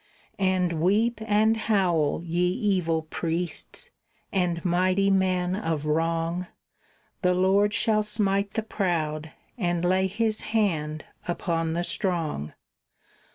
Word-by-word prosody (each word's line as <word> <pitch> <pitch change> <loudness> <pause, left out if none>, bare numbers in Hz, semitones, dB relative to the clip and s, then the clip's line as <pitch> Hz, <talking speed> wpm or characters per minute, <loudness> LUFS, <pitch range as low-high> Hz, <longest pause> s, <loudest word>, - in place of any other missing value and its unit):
And 180 -4 +1
weep 215 +6 +2
and 215 +1 +3
howl, 180 -9 +1
ye 175 +1 0
evil 180 -5 0
priests 165 +2 -3 0.4
and 175 -3 -1
mighty 185 +3 +2
men 185 -1 +1
of 165 -7 -2
wrong, 165 +3 0 0.7
The 180 -1 +2
Lord 195 +3 +3
shall 215 0 +2
smite 200 -2 +1
the 220 - 0
proud, 160 -7 -2 0.3
and 175 -3 0
lay 185 +1 +2
His 215 +2 0 0.2
hand 155 -7 0 0.2
upon 165 -2 -1
the 170 +1 -1
strong. 165 - -1
180 Hz, 110 wpm, -26 LUFS, 165-200 Hz, 0.7 s, and